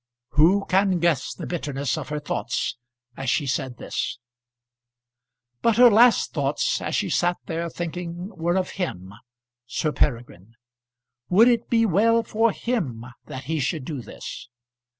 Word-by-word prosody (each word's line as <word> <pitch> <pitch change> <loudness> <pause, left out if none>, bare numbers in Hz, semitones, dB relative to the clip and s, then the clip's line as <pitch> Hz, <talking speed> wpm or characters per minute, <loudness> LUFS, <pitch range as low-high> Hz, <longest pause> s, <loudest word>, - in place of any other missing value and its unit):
Who 180 +7 +4
can 190 0 +2
guess 165 -6 +1
the - - -7
bitterness 145 -6 -2
of - - -6
her 150 0 -2
thoughts 135 -4 -2 0.4
as 135 -1 -3
she 145 +4 +1
said 130 -1 -2
this? - - -3 1.4
But 230 -2 +2
her 245 -1 +8
last 235 +3 +5
thoughts, - - 0
as - - -2
she - - 0
sat 175 0 +1
there 170 0 -3
thinking, 175 +3 -6
were 175 +1 0
of 185 - -1
him 95 - -4 0.5
Sir 155 +4 -1
Peregrine. 115 -7 -2 0.7
Would 220 +7 +6
it 235 -1 +1
be 230 -1 +3
well 225 +4 +3
for 225 0 +2
him 155 - -3 0.2
that 130 - -7
he 160 +3 -2
should 140 0 -2
do 145 -4 -5
this? 115 - -9
170 Hz, 150 wpm, -24 LUFS, 135-205 Hz, 1.4 s, her